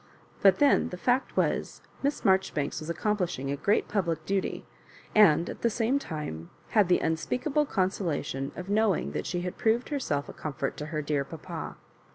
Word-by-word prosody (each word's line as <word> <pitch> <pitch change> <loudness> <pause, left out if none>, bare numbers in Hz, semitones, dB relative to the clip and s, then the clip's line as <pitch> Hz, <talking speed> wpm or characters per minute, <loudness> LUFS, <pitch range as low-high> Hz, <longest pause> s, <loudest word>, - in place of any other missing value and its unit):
But 195 -2 +6
then 290 -1 +4
the 180 - -6
fact 250 +7 0
was, - - 0 0.2
Miss 285 +1 -1
Marjoribanks 190 -7 +2
was 155 - -7
accomplish 195 +1 0
ing 135 +1 -3
a - - 0
great 200 +9 +1
public 175 -6 -1
duty, 195 -1 -1 0.5
and 170 -6 +6
at - - -7
the 235 - +3
same 235 +5 +1
time 120 - -6 0.2
had 210 -4 +4
the 180 - +5
unspeakable 255 - 0
consolation 170 - -1
of 180 - -6
knowing 210 0 +2
that - - -3
she 175 -1 -2
had 180 0 -5
proved 230 +2 +2
herself 155 - -1
a - - -8
comfort 140 -3 -4
to 150 - -5
her 155 -1 -3
dear 145 -1 0
papa. 160 +3 -7
180 Hz, 180 wpm, -28 LUFS, 155-215 Hz, 0.5 s, But